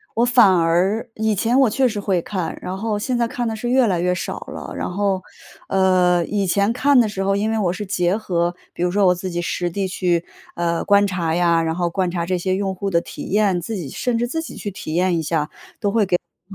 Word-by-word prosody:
我 235 - +3
反 240 -5 +6
而 175 +6 +1
以 220 0 0
前 235 +7 +2
我 265 - +5
确 260 +4 +2
实 215 -3 -3
会 195 -3 0
看， 185 -2 -4
然 185 - -4
后 215 +1 -1
现 245 +4 -1
在 235 -1 +1
看 240 0 -3
得 225 - -2
是 240 +2 -3
越 255 0 +4
来 180 -3 +1
越 180 +1 +1
少 - - -4
了。 - - -7
然 - - -3
后， 195 0 0 0.5
呃， 185 -2 +3
以 200 0 -1
前 200 +4 +2
看 275 +2 +4
的 235 - +4
时 195 -2 -4
候， 195 0 +1
因 210 +2 0
为 225 - 0
我 180 -4 +1
是 205 +3 -5
结 185 -1 +1
合， 175 -5 -1 0.2
比 - - -7
如 180 - +2
说 200 +2 +2
我 180 - +5
自 185 +1 -5
己 175 -1 -2
实 175 0 -2
地 195 +3 -2
去， 175 -2 0 0.3
呃， 170 -1 -1
观 200 0 +5
察 175 -4 -1
呀， 170 -1 +3
然 160 0 -1
后 175 -1 0
观 185 0 -1
察 170 -1 -2
这 185 +1 0
些 185 +1 -1
用 195 0 -1
户 195 +2 -3
的 170 -3 +2
体 - - -8
验， 200 -3 +2
自 220 +6 -4
己 170 -8 -5
甚 240 - -1
至 240 +1 0
自 320 +6 -2
己 320 - -8
去 205 - -5
体 155 -4 -6
验 180 -1 +2
一 - - -1
下， 155 -1 0
都 - - -19
会 - - -38
给 - - -27 0.7
我 195 - -17
190 Hz, 275 characters per minute, -21 LUFS, 175-215 Hz, 0.7 s, 反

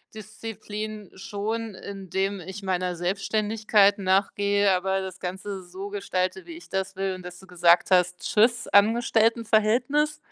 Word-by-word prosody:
Disziplin 215 -1 -7
schon, 210 +3 -4
indem 195 0 -3
ich 190 +3 -8
meiner 180 -1 -1
Selbstständigkeit 205 +3 +2
nachgehe, 200 +1 +2
aber 190 +1 0
das 190 -1 -7
Ganze 190 +2 -5
so 190 +3 -7
gestalte, 190 -2 -2
wie 340 - -9
ich 345 - -15
das 190 0 -3
will“ 190 0 -2
und 185 - -11
dass 180 0 -9
du 190 - -14
gesagt 175 0 +3
hast: 180 -1 +3
„Tschüss 235 +3 +2
Angestelltenverhältnis“? 230 +5 +2
200 Hz, 135 wpm, -25 LUFS, 185-215 Hz, -, gesagt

